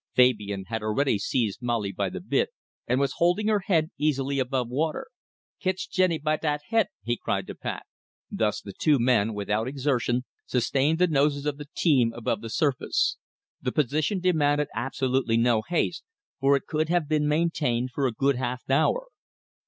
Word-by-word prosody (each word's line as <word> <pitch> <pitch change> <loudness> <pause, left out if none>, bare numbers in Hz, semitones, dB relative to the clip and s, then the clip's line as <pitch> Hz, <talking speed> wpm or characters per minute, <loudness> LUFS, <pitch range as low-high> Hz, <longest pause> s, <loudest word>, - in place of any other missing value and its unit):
Fabian 105 -6 +3
had 110 +1 -4
already 110 +1 +1
seized 110 0 -1
Molly 115 -5 -1
by - - -2
the - - -6
bit, - - 0 0.4
and 125 +2 +2
was 140 -2 +1
holding 180 +5 +2
her 210 -1 +3
head 165 -4 +2
easily 140 -2 0
above 130 -1 0
water. 150 +6 -1 0.5
"Kitch 185 0 -2
Jenny 185 -3 +2
by 155 0 0
dat 150 -1 -1
he't!" 225 -2 +3 0.2
he 120 +2 0
cried - - -2
to - - -7
Pat. - - -5 0.5
Thus 105 -2 0
the 100 - -9
two 150 - +3
men, 115 -3 +2
without 105 +3 -1
exertion, 130 -2 0 0.2
sustained 135 +5 +1
the 180 - +4
noses 145 -2 +1
of 145 -1 -1
the 145 -1 -9
team 130 -9 +3
above 120 - -2
the 115 - -6
surface. 140 +2 +1 0.4
The 125 - -1
position 150 - 0
demanded 150 -5 +2
absolutely 130 0 0
no 115 -1 +3
haste, 170 +5 -1 0.4
for 135 +1 +4
it 140 - -2
could 155 0 -1
have 175 -3 +1
been 150 -1 +1
maintained 150 -6 0
for 135 +1 0
a - - -1
good 135 +3 +1
half 125 0 -3
hour. 320 - +2
135 Hz, 175 wpm, -26 LUFS, 120-155 Hz, 0.5 s, the